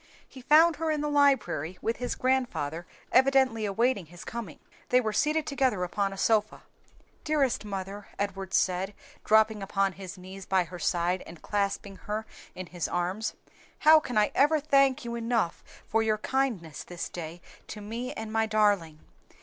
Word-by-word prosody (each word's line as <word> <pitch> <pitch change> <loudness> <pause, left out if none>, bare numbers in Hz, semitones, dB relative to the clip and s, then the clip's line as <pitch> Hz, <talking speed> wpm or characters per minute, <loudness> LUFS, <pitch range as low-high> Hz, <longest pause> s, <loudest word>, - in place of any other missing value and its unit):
He 260 - -12
found 310 +4 +5
her 325 +1 -1
in 305 -1 0
the 300 - -1
library 215 - +2
with 230 - -2
his 245 - -3
grandfather 240 - -1 0.2
evidently 260 -4 +4
awaiting 210 -2 0
his 175 +2 -12
coming. 225 -8 -6 0.3
They 250 - +5
were 220 -3 -1
seated 305 +7 +1
together 260 -9 0
upon 195 +2 -1
a 195 - -8
sofa. 215 +1 +1 0.6
"Dearest 290 -7 +1
mother," 195 0 -6
Edward 195 -2 -3
said, 190 +2 +1 0.3
dropping 220 -1 +4
upon 195 0 0
his 185 0 -9
knees 190 +1 -10
by 190 -1 +3
her 175 +1 -9
side 175 +1 0
and 170 -1 -12
clasping 200 -1 -2
her 215 +1 -4 0.3
in 185 - -6
his 175 -1 -4
arms, 185 +5 -2 0.4
"how 315 +1 +7
can 250 -7 -4
I 210 0 +3
ever 300 +2 +4
thank 275 -2 +3
you 235 - -4
enough 230 -6 -1 0.2
for 225 - +1
your 220 -1 +1
kindness 215 - -2
this 175 -1 -6
day 170 0 -7 0.3
to 215 - -7
me 230 +4 -5
and 220 -1 -6
my 225 0 +2
darling! 205 -8 +1
215 Hz, 165 wpm, -28 LUFS, 185-255 Hz, 0.6 s, how